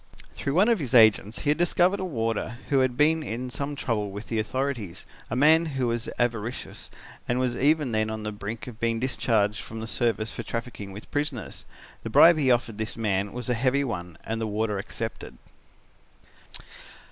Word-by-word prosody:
"Through 140 - -3
one 195 +5 +5
of 230 -4 +3
his 130 -4 -1
agents 110 -1 +5
he 150 -1 +3
discovered 175 +4 +2
a - - -2
warder 115 - -2
who 140 -2 +3
had 130 -2 +1
been 160 +2 +4
in 125 -2 -4
some 145 +3 -3
trouble 110 -6 -1
with 100 +2 -8
the 115 - 0
authorities, 120 -5 -3 0.2
a 110 - -2
man 160 +5 +5
who 130 - +1
was 115 -1 -1
avaricious 120 0 -2 0.4
and 120 +1 +1
was 125 -2 0
even 145 0 +2
then 110 0 +1
on 110 -1 -4
the 105 - -3
brink 105 +2 -6
of 115 -3 -10
being 115 -1 0
discharged 110 -5 +1
from 110 - -8
the 110 - -4
service 115 -1 0
for - - -5
trafficking 115 -4 -5
with 105 +3 -11
prisoners. 145 -6 -3 0.4
The - - -5
bribe 170 -1 +7
he 135 -3 +3
offered 120 -3 +1
this 110 +1 -3
man 100 -3 0
was 125 -1 -6
a 125 - +2
heavy 130 +4 +2
one 90 - -5
and 115 +1 -3
the 110 - -1
warder 105 -1 -1
accepted. 110 +2 -6
115 Hz, 190 wpm, -26 LUFS, 110-140 Hz, 0.4 s, bribe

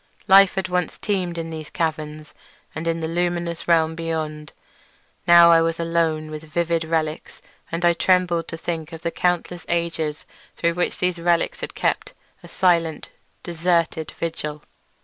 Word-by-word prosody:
Life 195 -1 +7
had 190 -1 -1
once 180 -2 -1
teemed 185 -4 -2
in 165 0 -4
these 155 -2 -7
caverns 155 -2 -3 0.4
and 160 +2 -5
in 165 0 0
the 160 - -1
luminous 170 0 -2
realm 160 -2 +3
beyond; 155 -2 -4 0.8
now 170 0 +8
I 165 -1 +6
was 165 0 0
alone 165 -2 0
with 155 0 -6
vivid 165 +1 -1
relics, 160 -1 -2 0.3
and 170 +1 -1
I 170 - +5
trembled 175 -2 +2
to 165 - -6
think 165 0 -5
of 165 - -9
the 170 - -1
countless 175 0 -1
ages 165 -3 -2 0.3
through 170 0 +1
which 175 +1 -1
these 180 -1 0
relics 170 0 +1
had - - -6
kept - - -1 0.3
a - - -12
silent 165 -4 +1
and - - -36 0.3
deserted 170 -2 0
vigil. 150 -2 -4
165 Hz, 160 wpm, -22 LUFS, 160-175 Hz, 0.8 s, now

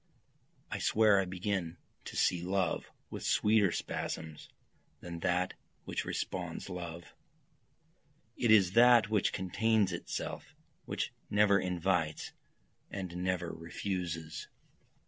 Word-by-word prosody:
I - - -2
swear 105 -2 +4
I 95 - +1
begin 90 -2 -2 0.3
to - - -7
see 90 -2 +2
love 95 -1 -1 0.2
with - - -5
sweeter 105 -3 +3
spasms 80 -1 -4 0.5
than 85 -1 -7
that 90 +2 +1 0.3
which - - -3
responds - - -4
love, 85 -1 -7 1.2
It 120 - 0
is 100 -5 +6
that 120 -1 +6
which 105 -3 +2
contains 105 +1 +1
itself, 85 - -5 0.3
which - - -3 0.2
never 100 -1 +4
invites 90 -3 -1 0.6
and 95 -3 -5
never 90 -1 -1
refuses. 85 -1 -4
90 Hz, 105 wpm, -32 LUFS, 85-100 Hz, 1.2 s, is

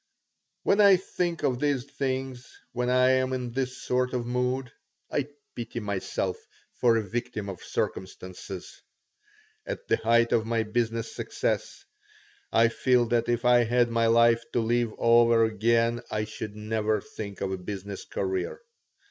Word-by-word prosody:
When 200 - +4
I 200 -2 +8
think 175 -2 -3
of 125 -2 +1
these 145 -3 +1
things, 130 -2 -4
when 125 0 -1
I 130 0 +4
am 130 0 +1
in 125 -2 -3
this 130 0 -2
sort 125 0 0
of 120 -1 -2
mood, 125 +1 -1 0.4
I 140 -2 0 0.3
pity 120 0 -5
myself 100 -3 -2 0.4
for 115 -2 +3
a 110 - 0
victim 115 -2 -4
of 95 - -7
circumstances. 95 0 -5 0.8
At - - -6
the - - +3
height 115 +1 +3
of 115 - +3
my 115 -1 +1
business 115 +1 -2
success - - -3 0.7
I 115 0 +5
feel 125 +1 +2
that 120 0 +1
if 120 0 0
I 120 -1 +6
had 120 +1 +2
my 115 0 +2
life 115 0 +4
to - - +2
live 120 0 +1
over 115 -1 +5
again 115 +2 +1
I 105 - -1
should 110 -1 -7
never 110 0 0
think 100 0 -8
of 95 - -2
a 95 - -2
business 100 +1 -6
career. 385 +5 -3
120 Hz, 155 wpm, -27 LUFS, 110-125 Hz, 0.8 s, I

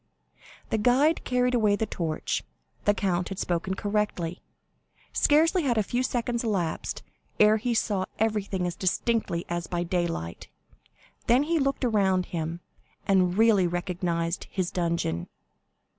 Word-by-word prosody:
The 220 - +1
guide 265 +8 +3
carried 250 0 +1
away 215 -4 +3
the 220 - -1
torch. 165 -6 -2 0.4
The 205 - +4
count 180 -4 0
had 195 - -5
spoken 180 +2 -1
correctly. 200 -5 -2 0.7
Scarcely 325 +5 +4
had 250 -6 +1
a 215 - +3
few 240 +5 -1
seconds 240 -1 -1
elapsed, 195 -8 -2 0.4
ere 215 +1 +6
he 235 +2 -1
saw 200 -4 0
everything 205 -4 0
as 175 -1 -2
distinctly 185 -1 0
as 175 0 -3
by 175 -1 -1
daylight. 170 - -3 0.8
Then 250 +4 +5
he 330 +2 +1
looked 275 -1 0
around 190 -5 +2
him, 165 0 -4 0.5
and 185 -2 +3
really 215 -5 +5
recognized 175 -1 -2
his 185 -3 -2
dungeon. 170 - -1
195 Hz, 135 wpm, -27 LUFS, 175-230 Hz, 0.8 s, ere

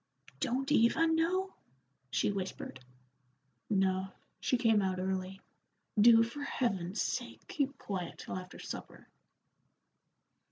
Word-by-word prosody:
"Don't 270 +1 -1
Eva 295 +5 +5
know?" 335 +4 +1 0.6
she 130 +10 +1
whispered. 190 -8 -5 0.9
"No, 190 -1 +2 0.3
she 250 - +1
came 225 -4 +4
out 190 -1 0
early. 190 0 -2 0.6
Do 225 +1 +8
for 235 +6 -5
Heaven's 200 -9 -1
sake - - -3
keep 280 -2 -1
quiet 185 -4 -4
till - - -6
after 185 0 -7
supper." - - -8
215 Hz, 110 wpm, -33 LUFS, 190-270 Hz, 0.9 s, Do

